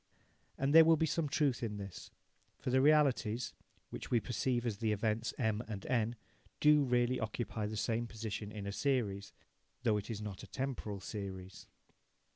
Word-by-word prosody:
And 135 Hz, +2 st, +1 dB
there 165 Hz, 0 st, +10 dB
will 165 Hz, 0 st, +5 dB
be 160 Hz, -, +2 dB
some 160 Hz, -1 st, -1 dB
truth 140 Hz, -3 st, +1 dB
in 105 Hz, -3 st, -3 dB
this, 100 Hz, -2 st, -8 dB, 0.5 s
for 125 Hz, -, -3 dB
the 130 Hz, +1 st, +4 dB
realities, 135 Hz, -6 st, +3 dB, 0.4 s
which -, -, -6 dB
we 120 Hz, -, +3 dB
perceive 120 Hz, +1 st, -1 dB
as 110 Hz, -4 st, -1 dB
the 110 Hz, 0 st, 0 dB
events 110 Hz, +2 st, 0 dB
M 110 Hz, -2 st, 0 dB
and 105 Hz, -3 st, -6 dB
N, 120 Hz, -2 st, +1 dB, 0.4 s
do 150 Hz, 0 st, +6 dB
really 125 Hz, -1 st, +2 dB
occupy 110 Hz, -1 st, -3 dB
the 110 Hz, +1 st, -4 dB
same 115 Hz, +2 st, 0 dB
position 110 Hz, -2 st, -5 dB
in 105 Hz, -2 st, -6 dB
a 100 Hz, -, -3 dB
series, 100 Hz, -6 st, -1 dB, 0.5 s
though 110 Hz, -4 st, +3 dB
it 105 Hz, -, -5 dB
is 110 Hz, -3 st, -3 dB
not 105 Hz, -3 st, -6 dB
a -, -, -10 dB
temporal 125 Hz, -7 st, -4 dB
series. 95 Hz, -2 st, -7 dB
115 Hz, 175 wpm, -34 LUFS, 105-130 Hz, 0.5 s, there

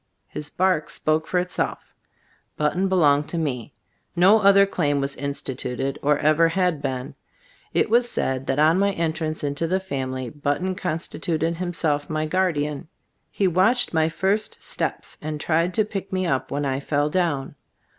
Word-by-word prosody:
His 150 Hz, -1 st, -7 dB
bark 185 Hz, -4 st, +1 dB
spoke 155 Hz, +1 st, 0 dB
for 180 Hz, -, 0 dB
itself. 180 Hz, 0 st, -2 dB, 0.6 s
Button 175 Hz, +6 st, +1 dB
belonged 150 Hz, -6 st, +3 dB
to 170 Hz, -, -3 dB
me. 145 Hz, -4 st, -3 dB, 0.4 s
No 190 Hz, +5 st, +6 dB
other 200 Hz, 0 st, +6 dB
claim 145 Hz, -7 st, 0 dB
was 140 Hz, 0 st, -2 dB
instituted, 135 Hz, -1 st, -3 dB
or 145 Hz, 0 st, +3 dB
ever 155 Hz, +3 st, +4 dB
had 175 Hz, -3 st, 0 dB
been. 130 Hz, 0 st, -3 dB, 0.6 s
It -, -, +2 dB
was 240 Hz, +2 st, +3 dB
said 130 Hz, -, -1 dB
that 135 Hz, -, 0 dB
on 160 Hz, +4 st, +4 dB
my 200 Hz, 0 st, +2 dB
entrance 160 Hz, -2 st, -2 dB
into 145 Hz, +3 st, -1 dB
the 185 Hz, +3 st, +1 dB
family, 130 Hz, -8 st, -4 dB
But 145 Hz, -1 st, -1 dB
ton 185 Hz, +1 st, -2 dB
constituted 165 Hz, -1 st, -2 dB
himself 165 Hz, -5 st, -1 dB
my 155 Hz, 0 st, -1 dB
guardian. 155 Hz, -3 st, -1 dB, 0.4 s
He 195 Hz, -, +1 dB
watched 185 Hz, +8 st, +3 dB
my 160 Hz, 0 st, +2 dB
first 200 Hz, +5 st, -1 dB
steps -, -, -4 dB
and 150 Hz, 0 st, -4 dB
tried 165 Hz, +3 st, +1 dB
to 215 Hz, -, +3 dB
pick 200 Hz, -2 st, -6 dB
me 185 Hz, -1 st, 0 dB
up 135 Hz, -6 st, -1 dB
when 145 Hz, +1 st, -2 dB
I 135 Hz, -1 st, -1 dB
fell 145 Hz, +1 st, 0 dB
down. 165 Hz, -6 st, 0 dB
160 Hz, 165 wpm, -23 LUFS, 145-185 Hz, 0.6 s, No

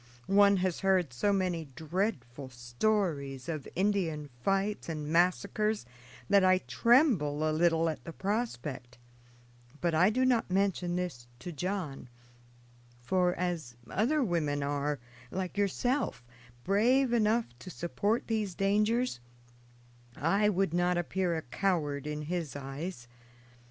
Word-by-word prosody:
One 200 Hz, 0 st, +5 dB
has 180 Hz, -3 st, -1 dB
heard 185 Hz, -8 st, +2 dB
so 200 Hz, +12 st, +1 dB
many 180 Hz, -4 st, 0 dB
dreadful 145 Hz, -, -3 dB
stories 135 Hz, -, -1 dB
of 155 Hz, -5 st, -4 dB
Indian 170 Hz, -7 st, 0 dB
fights 195 Hz, +4 st, 0 dB
and 155 Hz, -2 st, -4 dB
massacres 185 Hz, -, +1 dB, 0.4 s
that 200 Hz, -1 st, +5 dB
I 185 Hz, 0 st, +5 dB
tremble 155 Hz, -, +3 dB
a 155 Hz, -, +1 dB
little 165 Hz, 0 st, +3 dB
at 150 Hz, -6 st, -3 dB
the 165 Hz, -, -7 dB
prospect; 150 Hz, -, -3 dB, 0.8 s
but 170 Hz, -1 st, 0 dB
I 175 Hz, +5 st, +5 dB
do 255 Hz, +4 st, +1 dB
not 245 Hz, -5 st, +2 dB
mention 185 Hz, -2 st, 0 dB
this 175 Hz, -10 st, -4 dB
to 175 Hz, +8 st, -7 dB
John, 170 Hz, -5 st, -4 dB, 0.9 s
for 180 Hz, +8 st, +1 dB
as 170 Hz, -9 st, -3 dB, 0.2 s
other 275 Hz, +9 st, +2 dB
women 150 Hz, -, 0 dB
are, 145 Hz, +1 st, -1 dB, 0.3 s
like 185 Hz, +3 st, -4 dB
yourself, 205 Hz, -, 0 dB, 0.4 s
brave 240 Hz, +6 st, +3 dB
enough 225 Hz, 0 st, +3 dB
to 185 Hz, -, -9 dB
support 200 Hz, +6 st, -1 dB
these 215 Hz, -5 st, -2 dB
dangers, 210 Hz, -, +1 dB, 1.0 s
I 195 Hz, +8 st, +2 dB
would 195 Hz, -4 st, 0 dB
not 175 Hz, 0 st, +2 dB
appear 175 Hz, 0 st, 0 dB
a 160 Hz, -, -4 dB
coward 150 Hz, -1 st, -1 dB
in 150 Hz, 0 st, -3 dB
his 165 Hz, -2 st, -3 dB
eyes. 135 Hz, 0 st, -6 dB
180 Hz, 125 wpm, -30 LUFS, 150-200 Hz, 1.0 s, One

